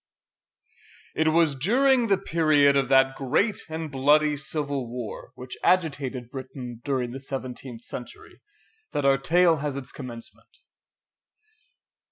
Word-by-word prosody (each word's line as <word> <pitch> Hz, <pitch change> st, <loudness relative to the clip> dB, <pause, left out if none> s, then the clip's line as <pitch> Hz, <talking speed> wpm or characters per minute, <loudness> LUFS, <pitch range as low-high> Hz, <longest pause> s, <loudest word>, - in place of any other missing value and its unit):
It 160 Hz, -, +1 dB
was 160 Hz, -1 st, +3 dB
during 240 Hz, -, +3 dB
the 195 Hz, -2 st, +3 dB
period 155 Hz, -6 st, +3 dB
of 135 Hz, -2 st, +2 dB
that 135 Hz, 0 st, +4 dB
great 190 Hz, -, 0 dB
and 160 Hz, -1 st, -5 dB
bloody 150 Hz, +3 st, +3 dB
Civil 140 Hz, -3 st, -3 dB
War 120 Hz, -1 st, -7 dB
which 125 Hz, +1 st, -8 dB
agitated 140 Hz, -8 st, 0 dB
Britain 130 Hz, -3 st, -8 dB
during 130 Hz, -4 st, -1 dB
the 135 Hz, -, -6 dB
seventeenth 130 Hz, -3 st, -7 dB
century, 125 Hz, -, -10 dB, 0.5 s
that 145 Hz, -, -1 dB
our 135 Hz, -1 st, +4 dB
tale 170 Hz, +3 st, +3 dB
has 145 Hz, -1 st, -3 dB
its 135 Hz, -2 st, -7 dB
commencement. 115 Hz, -3 st, -10 dB
140 Hz, 125 wpm, -25 LUFS, 130-155 Hz, 0.5 s, that